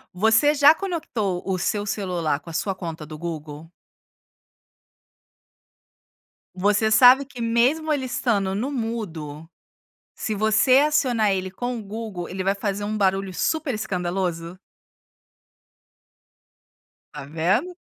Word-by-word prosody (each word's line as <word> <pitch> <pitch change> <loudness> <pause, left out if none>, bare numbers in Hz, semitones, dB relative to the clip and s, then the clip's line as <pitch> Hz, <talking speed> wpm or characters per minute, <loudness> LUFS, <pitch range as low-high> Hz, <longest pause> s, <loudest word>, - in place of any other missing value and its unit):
Você 225 +9 +4
já 290 +1 +6
conectou 245 - -3
o 190 -1 -2
seu 205 +3 -2
celular 175 -8 -1
com 150 - -31
a 165 - -7
sua 195 +3 -1
conta 165 -4 -6
do 155 0 -9
Google? 160 0 -7 2.8
Você 210 +3 +2
sabe 255 +4 +7
que 250 -3 -10
mesmo 255 +8 +1
ele 275 -3 0
estando 205 -6 0
no 235 +8 -2
mudo, 170 - -5 0.7
se 220 - -3
você 220 +5 +4
acionar 255 -7 +2
ele 190 -1 -2
com 245 +6 -4
o - - -7
Google, 205 -3 -6
ele 190 +1 -4
vai 195 +2 0
fazer 200 0 -3
um 215 +1 -3
barulho 195 -1 0
super 315 - -1
escandaloso? 180 -4 -3 2.6
Tá 140 -2 -8
vendo? 195 - 0
205 Hz, 120 wpm, -23 LUFS, 180-245 Hz, 2.8 s, sabe